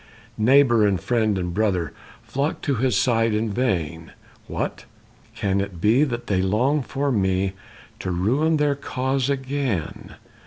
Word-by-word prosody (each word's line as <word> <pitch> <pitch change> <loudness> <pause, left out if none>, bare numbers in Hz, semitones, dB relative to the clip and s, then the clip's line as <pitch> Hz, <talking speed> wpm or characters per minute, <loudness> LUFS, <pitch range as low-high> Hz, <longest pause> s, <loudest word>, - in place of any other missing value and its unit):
Neighbor 120 -1 +5
and 100 -3 +2
friend 110 0 +1
and 90 -2 -3
brother 95 -5 0 0.3
Flocked 140 +3 -3
to 140 - +1
his 125 -3 +1
side 115 -1 +2
in 110 0 -1
vain, 85 -9 -2 0.3
"What, - - -4 0.5
can 100 -4 0
it 100 -3 -6
be 110 - +4
that 120 -4 -4
they 95 -2 +1
long 120 +10 +1
for 140 +2 -2
me 95 -3 +1 0.5
To - - -4
ruin 130 - +1
their 150 -1 +2
cause 135 -1 -2
again? 135 - -3
115 Hz, 145 wpm, -23 LUFS, 95-135 Hz, 0.5 s, Neighbor